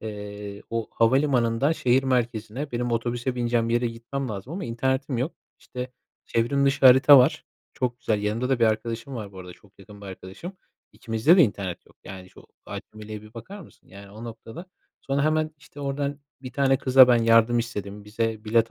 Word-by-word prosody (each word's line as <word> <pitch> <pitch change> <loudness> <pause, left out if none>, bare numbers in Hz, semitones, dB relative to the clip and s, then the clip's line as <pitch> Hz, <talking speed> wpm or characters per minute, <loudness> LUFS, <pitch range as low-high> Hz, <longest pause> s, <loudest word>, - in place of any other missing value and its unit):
Eee, 105 -1 -7
o 115 -1 -3
havalimanından 125 +1 +2
şehir 130 -4 +2
merkezine, 125 +1 -2
benim 120 0 -2
otobüse 120 +2 -2
bineceğim 120 -1 0
yere 120 +1 +1
gitmem 120 +3 -5
lazım 105 +6 -6
ama 190 +2 -4
internetim 130 +2 -1
yok. 130 +8 -2 0.3
İşte, 125 0 -7 0.3
çevrim 130 +5 0
dışı 140 0 +4
harita 130 +2 +8
var, 130 +4 +2 0.3
çok 125 -3 -2
güzel. 110 -4 -1
Yanımda 110 +4 -1
da 135 -2 +1
bir 115 - +4
arkadaşım 115 +4 -2
var 105 -4 -7
bu 95 - -12
arada, 90 -1 -9
çok 100 +2 -23
yakın 105 +1 -14
bir 100 - -10
arkadaşım. 95 - -9 0.4
İkimizde 115 - +2
de 180 - +7
internet 100 - -2
yok. - - -23
Yani, 95 -1 -10
şu - - -17 0.2
acemiliğe 105 0 -8
bir 110 +2 -16
bakar 195 - -9
mısın, 170 - -18
yani, 100 +1 -13
o 110 +3 -10
noktada. 115 +7 -9 0.3
Sonra 140 +1 -1
hemen, 155 0 +1
işte, 145 +1 -14
oradan 140 +1 -3 0.2
bir 130 -1 -8
tane 135 0 +2
kıza 130 -1 +6
ben 120 -2 +4
yardım 115 +1 +4
istedim. 105 -3 -5
Bize 110 +1 -3
bilet 115 +1 +2
120 Hz, 185 wpm, -25 LUFS, 110-135 Hz, 0.4 s, harita